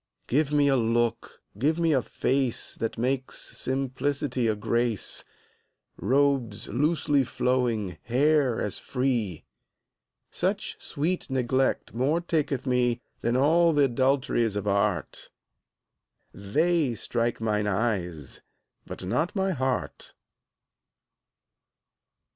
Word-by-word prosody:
Give 145 +3 +1
me 145 -1 +3
a 135 - +4
look, 115 -1 0 0.2
give 155 +6 +2
me 165 -2 +2
a 130 - +3
face 130 0 0
That 115 - -4
makes 130 +2 -1 0.2
simplicity 135 -1 -1
a 110 - +1
grace; 115 0 -1 0.7
Robes 135 -5 +1
loosely 145 +2 +1
flowing, 120 -6 -1
hair 135 0 +2
as 100 - -3
free: 120 - -1 0.9
Such - - -2
sweet 170 +4 -2
neglect 130 0 0
more 135 +8 +1
taketh 150 -6 -1
me 125 -2 +2 0.3
10 120 - 0
Than - - +2
all 165 +4 +4
th' 140 -3 +3
adulteries 130 -4 +1
of 105 0 -3
art; 100 -2 -1 1.0
They 150 - +1
strike 115 +1 -1
mine 105 -2 0
eyes, 95 - -2 0.5
but - - -7
not 160 - -1
my 190 -1 +1
heart. 130 - -3
130 Hz, 105 wpm, -27 LUFS, 115-145 Hz, 1.0 s, a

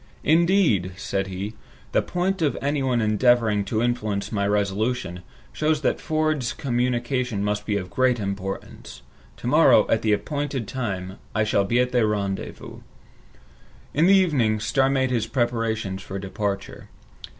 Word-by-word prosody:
"Indeed," 160 - +3
said 95 -1 -2
he, 95 +3 -5 0.4
"the - - +3
fact 185 +1 -1
of 150 -3 +1
anyone 135 -4 0
endeavoring 110 -1 +3
to 110 +1 -1
influence 110 -4 -1
my 100 -2 0
resolution, 105 -1 -1 0.3
shows 155 -1 0
that - - 0
Ford's 155 -5 0
communication 125 -3 -1
must 105 0 -2
be 105 -2 +1
of 90 -2 -6
great 130 -2 +2
importance. 100 -1 -6 0.3
To - - -11
morrow, - - +5
at - - +3
the 110 - +1
appointed 140 +2 -2
time, 95 -7 -4 0.2
I 110 - +3
shall 100 -2 +1
be 120 +5 +1
at 125 0 +1
the 120 -3 +3
rendezvous." 100 -2 -4 1.1
In 160 +4 +3
the 195 - +7
evening, 135 - +2
Starr 135 +5 +1
made 130 -1 +1
his 115 -3 0
preparations 115 -5 -1
for 95 - -6
departure. 100 +1 -4
115 Hz, 145 wpm, -24 LUFS, 100-130 Hz, 1.1 s, the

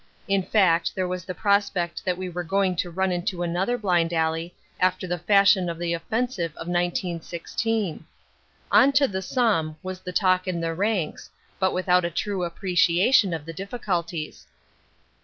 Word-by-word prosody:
In 195 -1 +2
fact 180 -4 +2
there 185 -1 -1
was 180 -1 -4
the 185 - -5
prospect 200 -4 0
that 180 -1 0
we 185 0 -4
were 175 0 -4
going 190 +2 +1
to 175 - -1
run 190 +2 0
into 175 0 -2
another 185 +8 0
blind 175 -6 +1
alley 165 +1 -1 0.2
after 185 0 +1
the 175 -1 -3
fashion 195 0 +4
of 170 - -4
the 170 0 -2
offensive 185 - -2
of 165 - -8
1916. 175 +2 -2 0.7
"On 275 - +6
to 280 -1 +4
the 190 -5 -3
Somme", 190 -9 0
was 185 0 -5
the 180 - -7
talk 185 -1 +2
in 180 -2 -1
the 165 0 -2
ranks, 190 -2 -2 0.3
but 190 -1 +2
without 180 0 +2
a 170 - 0
true 190 +2 -2
appreciation 180 +4 +3
of 160 -3 -4
the 165 - -7
difficulties. 175 -5 -4
180 Hz, 165 wpm, -25 LUFS, 170-195 Hz, 0.7 s, On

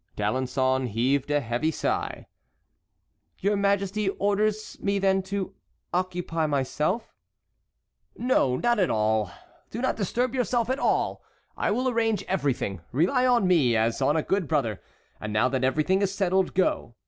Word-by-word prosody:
D'Alençon 130 +4 0
heaved 130 +6 0
a 145 0 0
sigh. 160 - -2 1.1
"Your 205 +2 +1
Majesty 200 0 +1
orders 210 +2 0
me 200 0 0
then 195 -1 +2
to 190 0 -4 0.4
occupy 175 -3 -1
myself"— 150 - -1 1.0
"No, 235 - +2
not 240 - +1
at 185 - +2
all. 110 -2 +1 0.4
Do 225 - -6
not 260 - 0
disturb 240 +5 -1
yourself 245 -1 0
at 265 - -1
all; - - 0 0.3
I - - -1
will 250 +5 0
arrange 225 -3 +1
everything; 135 - -1
rely 190 - +2
on 240 -5 +3
me, 145 -10 +3
as 115 +4 0
on 145 +4 +3
a 155 - 0
good 190 -4 0
brother. 135 - -1 0.4
And 110 - -5
now 110 +4 +3
that 130 0 -1
everything 155 +9 +2
is 195 -1 +1
settled, 190 -1 0
go. 180 -10 0
180 Hz, 145 wpm, -26 LUFS, 130-205 Hz, 1.1 s, on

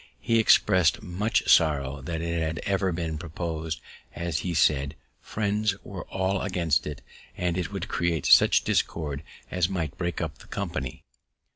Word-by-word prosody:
He 115 -1 +2
expressed 95 -5 +4
much 105 +6 0
sorrow 70 -4 +3
that 80 +4 -4
it 85 0 -1
had 80 0 -2
ever 95 -1 +1
been 80 -2 -3
propos'd, 80 -1 -4 0.4
as 85 -2 -2
he 90 -2 -3
said 70 -1 +2 0.3
Friends 105 -1 0
were 95 -3 -7
all 95 0 -1
against 85 -7 0
it, 75 -2 -7 0.3
and 90 -1 0
it 90 -3 -2
would - - -4
create 85 -2 -1
such - - +6
discord 75 -4 -1 0.3
as 90 0 +1
might 80 -7 -3
break 90 -2 -2
up - - -4
the - - -15
company. 65 -2 -4
85 Hz, 155 wpm, -27 LUFS, 80-95 Hz, 0.4 s, such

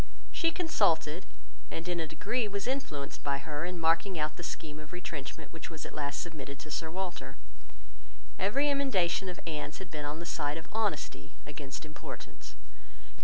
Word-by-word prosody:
She 330 - +4
consulted, 200 - +3 0.4
and 165 +2 -3
in 175 -1 +2
a 160 - +1
degree 210 +9 +2
was 200 -1 -1
influenced 160 - -1
by 140 -1 +3
her 150 +2 -2
in 180 -1 -2
marking 165 +3 +4
out 155 0 +1
the - - -5
scheme 155 -3 -4
of 155 0 -9
retrenchment 160 -3 -4
which 165 - -5
was 160 -2 -5
at - - -6
last 145 -2 0
submitted 140 -5 -4
to 155 - -7
Sir 160 +1 0
Walter. 170 -7 -3 1.0
Every 260 +10 +4
emendation 195 -11 +4
of 180 - -4
Anne's 150 -2 -2
had 190 -4 -7
been 150 -2 -2
on 145 +1 -1
the 170 - -4
side 150 -2 +1
of 160 - -6
honesty 205 - 0
against 145 0 -4
importance. 150 - -7
165 Hz, 170 wpm, -33 LUFS, 150-190 Hz, 1.0 s, She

